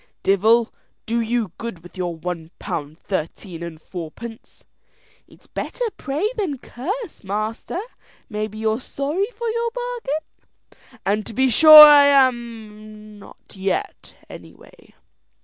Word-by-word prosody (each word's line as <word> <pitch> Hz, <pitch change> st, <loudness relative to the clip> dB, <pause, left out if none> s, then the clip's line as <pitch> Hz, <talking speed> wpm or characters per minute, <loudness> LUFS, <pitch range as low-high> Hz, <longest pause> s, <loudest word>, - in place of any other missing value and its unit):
"Divel 220 Hz, +4 st, +3 dB, 0.3 s
do 235 Hz, +1 st, 0 dB
you 230 Hz, -4 st, -1 dB
good 220 Hz, -8 st, -7 dB
with 175 Hz, -, -15 dB
your 175 Hz, -2 st, -3 dB
one 165 Hz, 0 st, -6 dB
pound 150 Hz, 0 st, -5 dB
thirteen 170 Hz, 0 st, -5 dB
and 170 Hz, -2 st, -7 dB
fourpence!" 185 Hz, +8 st, -10 dB, 0.6 s
"It's -, -, -21 dB
better -, -, -5 dB
pray 295 Hz, +8 st, -2 dB
than 355 Hz, -10 st, -2 dB
curse, 365 Hz, -, -6 dB
master. 215 Hz, -, -4 dB, 0.5 s
Maybe 215 Hz, -2 st, -5 dB
you're 220 Hz, +2 st, -1 dB
sorry 295 Hz, +11 st, -2 dB
for 470 Hz, -1 st, -6 dB
your 465 Hz, +1 st, -1 dB
bargain?" 485 Hz, -, -8 dB
"And 210 Hz, +2 st, 0 dB
to -, -, -8 dB
be 260 Hz, +3 st, +2 dB
sure 310 Hz, +3 st, +11 dB
I 290 Hz, -1 st, +8 dB
am 220 Hz, -6 st, -1 dB
not 200 Hz, -, -16 dB
yet, 200 Hz, -, -4 dB
any -, -, -12 dB
way." -, -, -20 dB
225 Hz, 130 wpm, -21 LUFS, 195-290 Hz, 0.6 s, sure